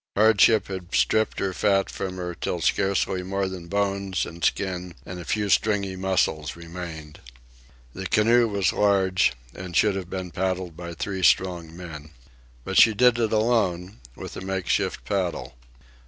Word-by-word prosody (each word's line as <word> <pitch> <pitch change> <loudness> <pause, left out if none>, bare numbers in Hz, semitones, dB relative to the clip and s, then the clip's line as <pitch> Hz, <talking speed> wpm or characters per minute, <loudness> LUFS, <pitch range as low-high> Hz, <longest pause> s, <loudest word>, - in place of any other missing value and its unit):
Hardship 110 0 +5
had 95 -2 -6
stripped 110 0 +2
her 95 -1 -1
fat 95 +1 +2
from 95 -1 -5
her 90 -1 -4
till 85 - -3
scarcely 95 +1 +1
more 95 +1 -2
than 90 -2 -7
bones 100 0 -1
and 85 0 -10
skin 90 -1 -1
and 90 -1 -7
a - - -7
few 105 +3 -1
stringy 100 -1 +1
muscles 90 -5 0
remained. 85 -3 -8 0.7
The 95 0 -5
canoe 115 +4 +4
was 100 -5 0
large 95 -2 +2 0.2
and 90 -1 -5
should 105 +1 +4
have 95 -2 -5
been 95 -2 -5
paddled 95 -2 -2
by 85 0 -7
three 95 +3 -4
strong 85 -3 +2
men. 80 -4 -9 0.5
But 95 - +4
she 110 -2 +5
did 125 +1 +4
it 115 -2 +1
alone, 105 - 0 0.2
with - - -8
a - - -6
make 95 -1 -3
shift - - -1
paddle. 95 -9 -2
95 Hz, 160 wpm, -25 LUFS, 90-100 Hz, 0.7 s, Hardship